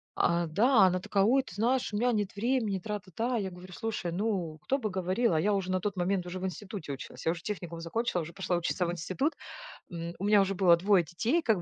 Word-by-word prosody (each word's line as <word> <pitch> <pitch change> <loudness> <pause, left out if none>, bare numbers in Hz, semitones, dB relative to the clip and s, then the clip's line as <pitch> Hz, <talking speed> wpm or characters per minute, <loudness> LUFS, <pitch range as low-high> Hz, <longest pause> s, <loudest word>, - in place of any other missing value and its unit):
А, 170 0 +2
да. 220 - +4
А 190 - +8
она 185 0 +1
такая: 195 +1 +1
"Ой, 265 +5 +4
ты 180 - -11
знаешь, 240 +2 +1
у - - 0
меня 245 +3 +2
нет 205 -3 -1
времени, 225 -3 0
тра-та-та". 210 +4 -3
Я 195 -3 -2
говорю: 180 +1 -11
"Слушай, 210 -5 -3
ну 180 -5 -1
кто 275 - +1
бы 220 -4 -2
говорил?" 190 +3 +1
А 160 - +3
я 210 +3 +2
уже 190 -2 -1
на 185 - +1
тот 205 +2 -2
момент 180 0 0
уже 180 +1 -5
в 185 - -3
институте 190 -2 -5
училась. 135 - -9
Я 165 - +3
уже 170 -1 -6
техникум 175 -5 -5
закончила, 180 +2 -1
уже 165 +1 -8
пошла 190 -2 -1
учиться 175 +1 0
в 170 - -1
институт. 185 - -1 0.6
М, 170 0 -5
у 195 - -4
меня 205 -1 +6
уже 195 0 0
было 180 -2 +6
2 190 0 +4
детей, 225 - 0
как 220 - +2
190 Hz, 245 wpm, -30 LUFS, 175-215 Hz, 0.6 s, А